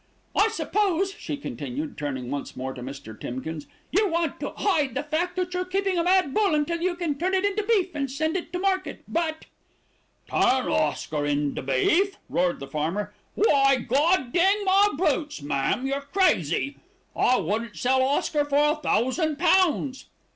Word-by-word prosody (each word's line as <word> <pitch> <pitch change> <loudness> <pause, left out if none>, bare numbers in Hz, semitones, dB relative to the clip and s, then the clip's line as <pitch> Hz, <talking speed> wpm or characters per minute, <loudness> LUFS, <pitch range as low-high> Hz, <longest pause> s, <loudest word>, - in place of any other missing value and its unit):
"I 410 - +5
suppose," 395 -4 0
she 295 - -5
continued, 280 +2 -5
turning 130 -4 -4
once 140 0 -5
more 130 +1 -4
to 125 - -9
Mr. 130 -3 -8
Timkins, 145 +5 -5 0.2
"you 405 +4 +3
want 330 -3 -1
to - - -3
hide 295 - +1
the 280 - -1
fact 320 +4 -1
that 365 -1 -2
you're 360 0 0
keeping 380 0 0
a - - +2
mad 360 -6 +3
bull 400 -5 +2
until 330 +3 -1
you 360 0 0
can 325 -5 -2
turn 370 +2 +1
it 380 +1 +1
into 405 +1 0
beef 405 -4 +1
and 280 -2 -2
send 315 +5 -1
it 365 - -3
to 360 - -2
market; 380 0 -1
but 320 -2 -2 0.4
" - - -41
"Turn 260 0 +2
Oscar 150 0 0
into 145 -1 -1
beef!" 320 - +2
roared 175 0 +1
the 140 - -6
farmer. 160 +8 -2 0.2
"Why, 275 -9 +4
God 265 +2 +1
dang 390 +4 +3
my 395 +2 +5
boots, 300 - 0
ma'am, 145 - 0
you're 275 +1 -1
crazy! 280 - +1 0.4
I 255 - +3
wouldn't 210 +2 -2
sell 260 +7 +2
Oscar 285 +2 +1
for 290 +1 +3
a - - 0
thousand 300 +2 0
pounds." 330 -6 +2
295 Hz, 175 wpm, -25 LUFS, 230-365 Hz, 0.4 s, I